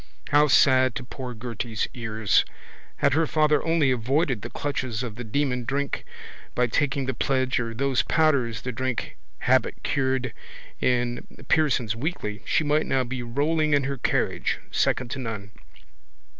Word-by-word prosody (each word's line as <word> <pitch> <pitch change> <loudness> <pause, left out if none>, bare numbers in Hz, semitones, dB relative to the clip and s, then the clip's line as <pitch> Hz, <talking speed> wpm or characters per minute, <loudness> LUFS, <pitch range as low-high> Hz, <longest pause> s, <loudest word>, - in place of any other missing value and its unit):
How 150 +1 +5
sad 130 -2 +5
to - - -4
poor 125 -1 -7
Gerty's 115 -1 -3
ears! 110 -3 +1 0.5
Had - - +2
her 160 +2 +2
father 150 -1 +3
only 165 -5 +3
avoided 125 - +1
the - - -6
clutches 130 -5 -3
of 120 -4 -4
the 120 +3 -7
demon 125 +2 -1
drink, 140 +3 -2 0.5
by 125 - +3
taking 135 +3 0
the 130 - -1
pledge 130 +1 +1
or 115 -2 -3
those 135 +1 +2
powders 130 -9 +1
the 125 - -2
drink 130 0 -3 0.3
habit - - +2
cured 130 -3 0 0.5
in 120 -1 0 0.2
Pearson's 130 -8 +2
Weekly, 115 - -3
she - - +2
might 150 +1 +1
now 130 -1 +2
be 125 0 -4
rolling 145 +5 +1
in 140 - +2
her 140 +1 -2
carriage, - - 0
second 125 -1 +1
to 135 - -3
none. 110 -5 -5
130 Hz, 155 wpm, -25 LUFS, 120-145 Hz, 0.5 s, How